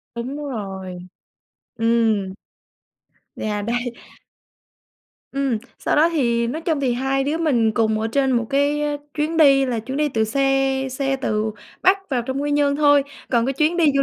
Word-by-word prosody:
Đúng 245 +4 -4
rồi, 195 -10 -6 0.8
ừm. 225 -4 +1 1.0
Yeah, 210 -1 -3
đấy. 240 +1 -2 1.4
Ừm, 275 -4 0 0.2
sau - - 0
đó 310 +3 +5
thì 235 -6 +1
nói 280 +7 -3
chung 320 -4 0
thì 260 -3 +1
hai 270 +2 0
đứa 295 +3 0
mình 245 -9 +2
cùng 220 -1 +1
ở 220 - 0
trên 270 -2 +2
một 235 -2 +1
cái 285 +2 +1 0.3
chuyến 310 +2 -1
đi 275 -4 +5
là 245 -3 -1
chuyến 260 +5 -5
đi 300 0 +1
từ 220 -5 0
xe 270 +2 +1
xe 270 +1 -1
từ 215 -4 -1 0.3
Bắc 385 +1 +3
vào 250 -3 0
trong 265 +3 -3
Quy 290 - -1
Nhơn 290 -1 +2
thôi. 290 -1 +5 0.3
Còn 235 -2 +2
cái 270 - 0
chuyến 305 +5 +1
đi 320 -5 +4
du 275 - +4
270 Hz, 170 wpm, -21 LUFS, 230-290 Hz, 1.4 s, đó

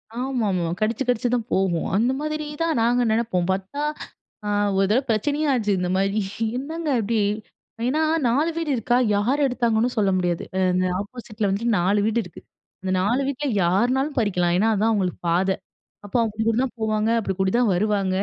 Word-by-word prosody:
ஆமாமா, 235 -8 -1 0.2
கடிச்சு 225 +4 0
கடிச்சு 245 0 +1
தான் 235 -1 -1
போகும் 185 -3 +1
அந்த 235 +5 +2
மாதிரி 305 0 -3 0.2
தான் 330 -4 +1
நாங்க 240 +2 +3
நெனப்போம். 220 -6 0
பாத்தா, 195 +10 -3 0.6
அ - - -3 0.3
ஒரு 195 - +4
தடவ 255 +5 +3
பிரச்சனயே 290 +8 0
ஆச்சு 215 -5 0
இந்த 180 0 -1
மாரி 195 +2 +1 0.4
என்னங்க 315 +4 -4
இப்டி? 220 +1 0 0.7
ஏனா 300 +5 +1 0.3
4 285 +8 +2
வீடு 325 -3 -2
இருக்கா 240 +1 +1 0.2
யார் 255 +8 +1
எடுத்தாங்கனு 235 -2 +1
சொல்ல 200 -2 +3
முடியாது. 175 -2 -1
அ - - +1
இந்த 185 0 +1
ஆப்போசிட் 220 +1 -9
ல - - +3
வந்துட்டு 220 +5 -1
4 195 +4 +2
வீடு 225 +2 +1
இருக்கு. 180 - -12 0.4
அந்த 190 - -2
4 235 +8 +1
வீட்ல 280 +1 -3 0.2
யார்னாலும் 245 - +1
பறிக்கலாம் 180 -5 +1
ஏனா 220 +3 +3
அதான் 215 +3 +2
அவங்களுக்கு 190 -5 -1
பாத. 180 +3 +2 0.6
அப்ப 205 - -12
அவங்க 220 -2 -1
அப்டி 220 - 0
கூடி 230 +2 +2
தான் 260 - -5
போவாங்க, 215 0 0
அப்டி 195 -3 -2
கூடி 190 0 +2
தான் 240 -5 +3
வருவாங்க, 195 -1 0
220 Hz, 180 wpm, -23 LUFS, 195-250 Hz, 0.7 s, ஒரு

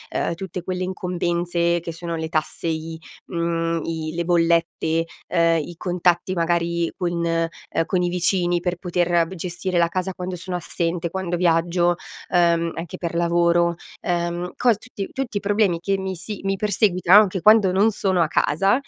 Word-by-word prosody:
uhm, - - 0
tutte 180 0 -6
quelle 185 0 -3
incombenze 175 -1 -1
che 165 0 -6
sono 170 0 -5
le 160 0 -3
tasse, 155 0 -2
i, 160 0 -3 0.3
uhm, 165 -1 -1
i 160 -1 -3
le 170 - -1
bollette, 165 -1 +1 0.2
uhm, 165 -1 +3
i 175 - -8
contatti 180 0 +1
magari 170 0 0
con, 180 -3 -2
uhm, 165 -1 -1
con 180 +1 0
i 175 - +1
vicini. 175 0 +1
Per 180 0 -2
poter 175 -1 +1
gestire 180 +1 -3
la 170 - +4
casa 185 +2 -2
quando 180 0 -5
sono 180 +1 -4
assente, 170 +1 -2
quando 180 -1 -2
viaggio, 175 0 +2 0.3
uhm, 170 -1 +2
anche 165 -1 -6
per 170 -1 -4
lavoro, 170 0 +2 0.3
uhm, 175 0 -2
co 240 -3 +4
tutti 205 -2 -7
tutti 265 -6 -3
i - - 0
problemi 200 -4 +1
che 195 +3 0
mi 190 -1 -4
si 200 +4 -6
mi 195 0 0
perseguitano, 200 -1 +5
anche 190 -3 -1
quando 215 -2 +6
non 200 +4 +4
sono 190 -4 +1
a 160 - +3
casa, 195 +7 +2
175 Hz, 170 wpm, -22 LUFS, 170-185 Hz, 0.3 s, quando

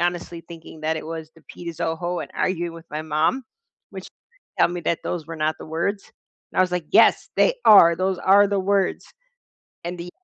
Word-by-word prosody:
honestly 175 -1 -2
thinking 165 -2 -12
that 160 +1 0
it 155 - -7
was 160 -1 -7
"the 165 - -19
pita 170 -1 -7
zoho," 170 +2 -3
and - - -10
arguing 175 -2 -1
with 165 0 -12
my 155 +1 -4
mom, 160 - 0 0.5
which - - -9 0.5
tell - - +6
me 175 0 -5
that 170 - -1
those 175 -3 -3
were 165 - -7
not 155 0 0
the - - -10
words. 170 +6 -3 0.4
And - - -4
I - - +7
was 180 -1 -2
like, 175 -3 -2
"Yes, - - +4
they - - +3
are, 170 -5 +8
those 185 +1 -1
are 200 +3 +5
the 200 -1 0
words." 195 0 0 0.8
And 175 +1 -5
the 170 +1 -7
170 Hz, 205 wpm, -23 LUFS, 160-185 Hz, 0.8 s, are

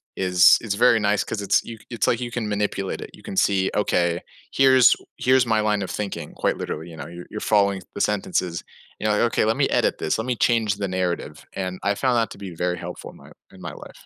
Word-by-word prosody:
is 90 -1 +5
is 105 -3 -2
very 120 +1 +4
nice 105 0 +1
'cause 105 - -4
it's 100 - +2
you 115 - -8
it's 115 -4 -1
like 120 +1 +1
you 120 - -3
can 115 -2 -3
manipulate 105 -2 -2
it. - - -7
You - - -16
can 95 - -7
see," 95 -1 +2
Okay. 85 -4 +1 0.3
Here's 130 -2 +6 0.2
here's 130 -1 +3
my 110 -1 +2
line 105 -1 +1
of 95 - -4
thinking," 105 -2 -5
quite - - -1
literally, 80 +3 -5
you 80 - -11
know? - - -7
You're 85 +1 -10
you're 105 - -5
following 100 -2 +2
the - - -3
sentences, 90 -4 -1 0.4
you 110 - -1
know? 105 - +2
"Okay, 115 - +1
let 110 - +1
me - - +3
edit - - +1
this, 80 - -1
let 110 - -2
me 125 - 0
change 110 -3 +2
the 100 -1 -3
narrative." 90 -1 -3
And 95 -1 -4
I 100 0 +1
found 130 +1 +1
that 115 - +1
to - - -9
be 95 -3 -8
very 90 +1 -1
helpful - - -8
in - - -17
my - - -16 0.2
in 95 - -15
my 85 - -6
life. - - -13
100 Hz, 245 wpm, -23 LUFS, 95-115 Hz, 0.4 s, Here's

